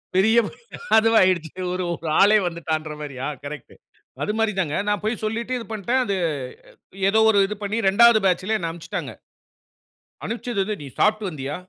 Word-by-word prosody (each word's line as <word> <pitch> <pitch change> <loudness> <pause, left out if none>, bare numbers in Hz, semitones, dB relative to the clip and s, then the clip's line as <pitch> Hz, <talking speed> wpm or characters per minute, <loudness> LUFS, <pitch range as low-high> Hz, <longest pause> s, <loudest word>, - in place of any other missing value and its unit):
பெரிய 220 +5 +4 0.6
அதுவாகிடுச்சு. 185 -8 +3 0.2
ஒரு 180 -1 -2 0.4
ஆளே 210 +2 +6
வந்துட்டான்ற 160 -2 -3
மாரியா 135 -2 -5 0.2
கரெக்ட். 150 +1 -8 0.5
அது 210 - -1
மாரி 225 -1 +2
தாங்க 155 -5 -1
நான் 205 - 0
போய் 220 +1 -2
சொல்லீட்டு 230 +3 -3
இது 230 - -7
பண்ட. 210 +1 -7 0.2
அது 200 -3 -1 0.9
ஏதோ 220 - +3
ஒரு 205 - +4
இது 210 - -5
பண்ணி 210 +3 -2
2ஆவது 235 +3 +6
பேட்ச்ல 190 +4 +1
என்ன 165 -3 -3
அனுப்பிச்சுட்டாங்க. 170 -1 -6 1.1
அனுப்பிச்சது 230 -2 -3
வந்து 215 +2 -3
நீ 140 - -8
சாப்பிட்டு 215 -1 +2
வந்தியா? 145 -2 -5
200 Hz, 150 wpm, -23 LUFS, 165-220 Hz, 1.1 s, ஆளே